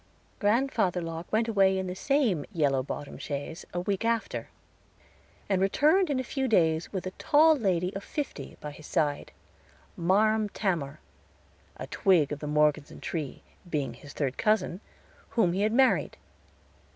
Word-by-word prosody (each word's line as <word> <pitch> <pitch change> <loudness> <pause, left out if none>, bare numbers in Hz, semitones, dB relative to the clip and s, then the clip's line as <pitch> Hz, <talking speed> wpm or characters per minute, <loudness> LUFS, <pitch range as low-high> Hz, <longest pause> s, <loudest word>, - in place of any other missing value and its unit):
Grandfather 205 -4 +1
Locke 165 0 -6
went 225 +2 +2
away 195 -3 +3
in 190 - -2
the 180 - -4
same 225 - +1
yellow 145 -7 +1
bottomed 145 +2 -7
chaise 145 +3 -5
a 175 - -2
week 195 +3 -2
after, 230 -1 -1 1.0
and 195 -2 +1
returned 305 - +3
in 275 -3 0
a - - -1
few 265 +1 -2
days 165 -7 +2
with 190 -3 -4
a 185 - -3
tall 315 +2 +5
lady 185 - 0
of 195 - -5
fifty 295 -2 -5
by 150 - -6
his 150 +1 -12
side 145 -2 -1 0.6
"Marm 210 +5 +2
Tamor," 165 -9 -2 0.8
a - - -5
twig 175 -8 +2
of 150 - -3
the 150 - -5
Morgeson 150 -1 +1
tree, 155 -6 -5 0.3
being 145 -4 -2
his 145 - -12
third 135 -3 -2
cousin, 215 -4 +1 0.5
whom 195 -7 +2
he 190 - -1
had 215 +1 +2
married. 260 +3 +3
185 Hz, 155 wpm, -28 LUFS, 155-220 Hz, 1.0 s, tall